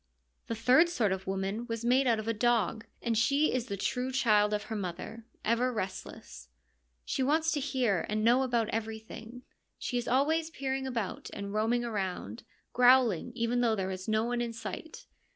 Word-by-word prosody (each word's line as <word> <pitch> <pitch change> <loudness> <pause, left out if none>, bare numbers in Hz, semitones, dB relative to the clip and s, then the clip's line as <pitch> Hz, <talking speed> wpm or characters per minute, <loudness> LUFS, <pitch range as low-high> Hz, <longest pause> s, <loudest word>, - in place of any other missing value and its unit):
The 230 - -2
third 255 +9 +5
sort 230 - +1
of 190 0 -3
woman 195 +4 -2
was 230 -1 -4
made 255 +2 +4
out 230 -2 +3
of 215 0 -5
a 230 - +1
dog, 225 -1 +1 0.2
and 235 -1 0
she 280 +7 +3
is 250 -2 -1
the 200 - -4
true 250 +6 -1
child 215 -5 +3
of 210 0 -1
her 220 +1 -5
mother, 210 +4 -6 0.2
ever 240 +3 +2
restless. 185 - -6 0.6
She - - -2
wants 315 +4 +2
to 300 - 0
hear 255 - 0
and 215 +1 0
know 240 +3 +5
about 240 -4 +1
everything; 225 +2 -6 0.3
she 245 - -2
is 240 - -5
always 315 +6 +2
peering 270 -4 -3
/'about 230 -7 -3
and 200 0 -5
roaming 230 +3 +1
around, 190 - -3 0.3
growling 245 -5 +4
even 235 +1 0
though 230 -2 +3
there 190 -2 -2
is 185 0 -6
no 215 0 +2
one 240 +1 -1
in 235 -1 -3
sight. 230 +7 -7
230 Hz, 185 wpm, -30 LUFS, 210-250 Hz, 0.6 s, third